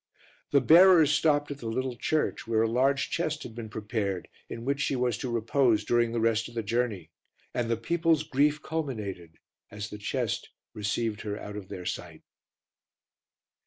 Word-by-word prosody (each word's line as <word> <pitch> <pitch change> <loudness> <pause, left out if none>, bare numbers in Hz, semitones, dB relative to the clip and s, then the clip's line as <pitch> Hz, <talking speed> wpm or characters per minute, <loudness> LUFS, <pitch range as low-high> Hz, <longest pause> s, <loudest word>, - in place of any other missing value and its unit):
The 140 - +4
bearers 165 +1 +7
stopped 145 -1 +2
at 140 - -6
the 115 - -6
little 130 +2 -2
church, 150 +1 -1
where 110 -1 +2
a - - +2
large 130 +4 +1
chest 155 -2 -1
had 115 - -8
been 115 -1 -7
prepared 105 -4 -3 0.2
in 115 +1 -6
which 140 +2 0
she 140 - 0
was 125 -3 +1
to 125 - -3
repose 120 0 +2
during 120 -1 +2
the 115 - -1
rest 115 0 +1
of 120 - -15
the 115 - -1
journey, 110 -5 -2 0.4
and 120 -2 -1
the 115 - +1
people's 165 +4 +1
grief 150 +1 +1
culminated 105 - -4 0.3
as 105 +1 -7
the 105 - -7
chest 105 - -2 0.2
received 105 +1 -2
her 105 -1 -4
out 105 - -8
of 100 -2 -8
their 90 - -7
sight. - - -5
120 Hz, 175 wpm, -28 LUFS, 110-140 Hz, 0.4 s, bearers